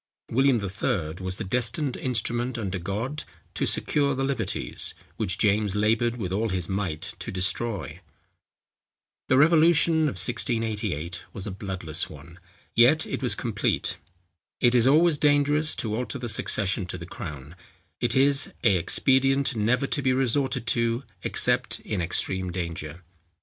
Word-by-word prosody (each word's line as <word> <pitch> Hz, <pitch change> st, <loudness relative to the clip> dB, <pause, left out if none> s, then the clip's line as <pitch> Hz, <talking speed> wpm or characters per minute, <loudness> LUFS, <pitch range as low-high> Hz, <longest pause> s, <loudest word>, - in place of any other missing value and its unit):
William 135 Hz, +2 st, +4 dB
III. 100 Hz, -4 st, -2 dB
was 95 Hz, 0 st, -3 dB
the -, -, -4 dB
destined 125 Hz, -, -1 dB
instrument 120 Hz, 0 st, -1 dB
under 95 Hz, -4 st, -3 dB
God, 110 Hz, -, -4 dB, 0.3 s
to -, -, -1 dB
secure 140 Hz, -2 st, +1 dB
the 135 Hz, -, -1 dB
liberties, 135 Hz, -1 st, 0 dB, 0.2 s
which 95 Hz, -5 st, +1 dB
James 105 Hz, -1 st, +1 dB
laboured 115 Hz, +3 st, +1 dB
with 95 Hz, -6 st, -4 dB
all 110 Hz, +3 st, 0 dB
his 90 Hz, -3 st, -2 dB
might 95 Hz, -6 st, -3 dB
to -, -, -6 dB
destroy. 95 Hz, -1 st, -2 dB, 1.3 s
The 130 Hz, -, +4 dB
revolution 160 Hz, +1 st, +4 dB
of -, -, -6 dB
1688 110 Hz, -, -1 dB
was 95 Hz, -, -5 dB
a 105 Hz, -, -4 dB
bloodless 95 Hz, -4 st, -4 dB
one; 80 Hz, +4 st, -13 dB, 0.3 s
yet 130 Hz, +7 st, +5 dB
it -, -, -4 dB
was -, -, +1 dB
complete. -, -, -1 dB, 0.6 s
It 120 Hz, -1 st, +4 dB
is 125 Hz, 0 st, +4 dB
always 155 Hz, +2 st, +4 dB
dangerous 145 Hz, +1 st, +3 dB
to 110 Hz, -2 st, -2 dB
alter 125 Hz, +4 st, -3 dB
the 125 Hz, -2 st, -5 dB
succession 100 Hz, -3 st, 0 dB
to 90 Hz, -, -5 dB
the 85 Hz, -, -8 dB
crown; 75 Hz, -4 st, -8 dB, 0.4 s
it 120 Hz, -, 0 dB
is 135 Hz, +1 st, +3 dB
a 100 Hz, -5 st, +4 dB
expedient 135 Hz, +8 st, +2 dB
never 115 Hz, +5 st, +1 dB
to 145 Hz, -, 0 dB
be 130 Hz, -1 st, +2 dB
resorted 130 Hz, -1 st, 0 dB
to 115 Hz, +1 st, 0 dB, 0.2 s
except -, -, +1 dB
in 100 Hz, -4 st, -3 dB
extreme 90 Hz, +2 st, -1 dB
danger. 85 Hz, -2 st, -5 dB
115 Hz, 145 wpm, -26 LUFS, 95-135 Hz, 1.3 s, yet